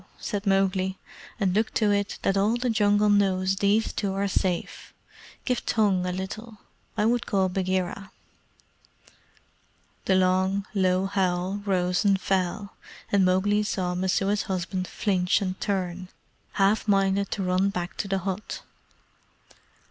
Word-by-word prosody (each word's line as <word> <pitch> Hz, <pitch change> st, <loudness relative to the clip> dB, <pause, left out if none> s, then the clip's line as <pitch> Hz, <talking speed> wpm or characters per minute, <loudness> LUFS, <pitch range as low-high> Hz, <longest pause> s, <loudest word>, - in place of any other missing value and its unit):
said 205 Hz, 0 st, -4 dB
Mowgli; 190 Hz, -1 st, +1 dB, 0.4 s
"and 190 Hz, -4 st, +1 dB
look 215 Hz, +3 st, +1 dB
to 210 Hz, -2 st, +3 dB
it 200 Hz, 0 st, -1 dB
that 195 Hz, -, +2 dB
all 205 Hz, +4 st, +2 dB
the 250 Hz, 0 st, 0 dB
Jungle 205 Hz, -1 st, +3 dB
knows 190 Hz, -1 st, +2 dB
these 205 Hz, +3 st, +2 dB
two 200 Hz, -2 st, -2 dB
are 200 Hz, +1 st, 0 dB
safe. 185 Hz, -2 st, -2 dB, 0.5 s
Give 250 Hz, -2 st, -1 dB
tongue 195 Hz, -5 st, +1 dB
a -, -, -1 dB
little. 210 Hz, +5 st, -6 dB, 0.4 s
I 210 Hz, -, +2 dB
would 240 Hz, +1 st, +1 dB
call 190 Hz, -2 st, +1 dB
Bagheera." 185 Hz, +1 st, -2 dB, 2.0 s
The 190 Hz, -, +3 dB
long, 185 Hz, +1 st, +2 dB
low 185 Hz, -1 st, +2 dB
howl 190 Hz, 0 st, -1 dB
rose 180 Hz, -1 st, +1 dB
and 200 Hz, -2 st, +3 dB
fell, 195 Hz, +2 st, -1 dB, 0.4 s
and 200 Hz, -1 st, +4 dB
Mowgli 190 Hz, +3 st, +2 dB
saw 185 Hz, -4 st, -2 dB
Messua's 195 Hz, +3 st, 0 dB
husband 185 Hz, 0 st, -2 dB
flinch 185 Hz, -4 st, +1 dB
and 190 Hz, -2 st, -4 dB
turn, 185 Hz, -2 st, -2 dB, 0.5 s
half 205 Hz, +3 st, +2 dB
minded 195 Hz, -1 st, +2 dB
to 195 Hz, -, -2 dB
run 185 Hz, +2 st, +2 dB
back 180 Hz, -2 st, -4 dB
to -, -, -3 dB
the 195 Hz, 0 st, 0 dB
hut. 190 Hz, +2 st, -4 dB
195 Hz, 140 wpm, -26 LUFS, 185-205 Hz, 2.0 s, and